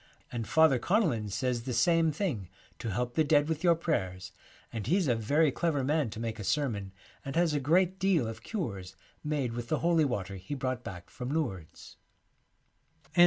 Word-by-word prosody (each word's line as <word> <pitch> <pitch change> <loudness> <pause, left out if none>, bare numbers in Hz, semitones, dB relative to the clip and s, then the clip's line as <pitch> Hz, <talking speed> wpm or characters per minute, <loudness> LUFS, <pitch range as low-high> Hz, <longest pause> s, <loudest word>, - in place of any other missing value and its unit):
' - - -33
And 115 -3 -3
Father 160 -5 +5
Connellan 150 - +1
says 120 +4 -1
the 125 +1 -4
same 165 +4 +4
thing, 140 - -2 0.3
to 115 - -4
help 120 +3 -2
the 160 - +3
dead 145 0 +3
with 160 0 -2
your 170 -2 +5
prayers, 95 - -2 0.4
and 110 -3 -4
he's 180 -1 +2
a 125 - +4
very 140 +7 +2
clever 150 -2 0
man 145 -2 +1
to 110 - -7
make 115 -1 -3
a - - -4
sermon, 105 -5 -1 0.3
and 135 - -5
has 170 -2 +3
a 145 - +1
great 180 +6 +2
deal 180 -8 +3
of 110 - -6
cures 100 - -4 0.3
made 145 -6 -1
with 120 0 -5
the 155 - +2
Holy 170 -2 +4
Water 100 -7 -3
he 95 +10 -5
brought 130 -2 -2
back 90 -2 -8
from 125 0 -5
Lourdes.' 120 - -4
135 Hz, 190 wpm, -30 LUFS, 110-160 Hz, 0.4 s, Father